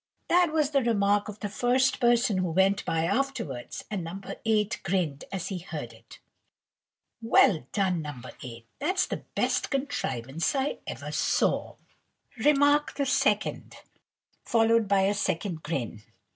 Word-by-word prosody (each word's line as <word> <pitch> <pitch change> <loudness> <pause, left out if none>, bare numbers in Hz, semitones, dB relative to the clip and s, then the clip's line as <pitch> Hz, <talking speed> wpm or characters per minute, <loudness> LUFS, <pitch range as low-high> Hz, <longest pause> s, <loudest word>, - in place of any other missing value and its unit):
That 350 -2 +4
was 305 -2 +1
the 275 -2 +3
remark 205 -3 +2
of 210 0 -9
the 205 - -2
first 250 +5 +1
person 240 -4 +3
who 180 -1 0
went 190 +4 +2
by 160 0 0
afterwards, 200 - -3
and 195 -4 -2
No. 170 +4 -6 0.3
8 215 -1 +1
grinned 175 -7 -1
as 190 -2 -4
he 190 -3 -3
heard 150 -9 -7
it. 115 0 -16 1.0
"Well 185 - +4
done, 190 -5 0
No. 145 -4 -7 0.2
8! 115 -2 -9
that's 370 +6 +1
the - - -5
best - - 0
contrivance 155 - -2
I 270 +1 -1
ever - - -6
saw!" - - 0 0.7
Remark 290 0 +4
the 280 - 0
second, 270 - 0 0.7
followed 230 -1 +3
by 195 -1 +3
a 195 +1 +2
second 175 -4 -2
grin. 125 -9 -4
200 Hz, 145 wpm, -27 LUFS, 165-255 Hz, 1.0 s, That